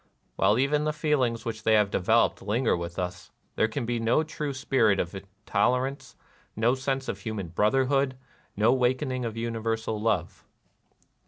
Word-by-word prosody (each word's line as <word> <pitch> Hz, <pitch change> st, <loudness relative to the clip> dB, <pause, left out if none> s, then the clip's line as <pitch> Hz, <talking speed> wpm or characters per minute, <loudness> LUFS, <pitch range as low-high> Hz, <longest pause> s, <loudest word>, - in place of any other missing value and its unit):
While 105 Hz, -, +3 dB
even 145 Hz, +3 st, +2 dB
the 155 Hz, -, 0 dB
feelings 145 Hz, -6 st, 0 dB
which 110 Hz, -1 st, -4 dB
they 110 Hz, +1 st, +2 dB
have 105 Hz, -2 st, +3 dB
developed 110 Hz, +5 st, +2 dB
linger 115 Hz, +5 st, +1 dB
with 85 Hz, 0 st, -6 dB
us, 90 Hz, -1 st, -4 dB, 0.3 s
there 110 Hz, -, +2 dB
can 115 Hz, +3 st, -4 dB
be 120 Hz, 0 st, -1 dB
no 115 Hz, +7 st, +2 dB
true 150 Hz, -2 st, -4 dB
spirit 130 Hz, -6 st, +2 dB
of 85 Hz, +2 st, -3 dB, 0.3 s
tolerance, 125 Hz, +6 st, 0 dB, 0.4 s
no 115 Hz, +3 st, +2 dB
sense 135 Hz, 0 st, -2 dB
of -, -, -4 dB
human 110 Hz, -7 st, -5 dB
brotherhood, 130 Hz, -, +1 dB, 0.4 s
no 110 Hz, +4 st, +4 dB
wakening 130 Hz, 0 st, 0 dB
of 115 Hz, -1 st, -5 dB
universal 115 Hz, -1 st, -2 dB
love. 105 Hz, -6 st, -1 dB
115 Hz, 155 wpm, -27 LUFS, 105-130 Hz, 0.4 s, no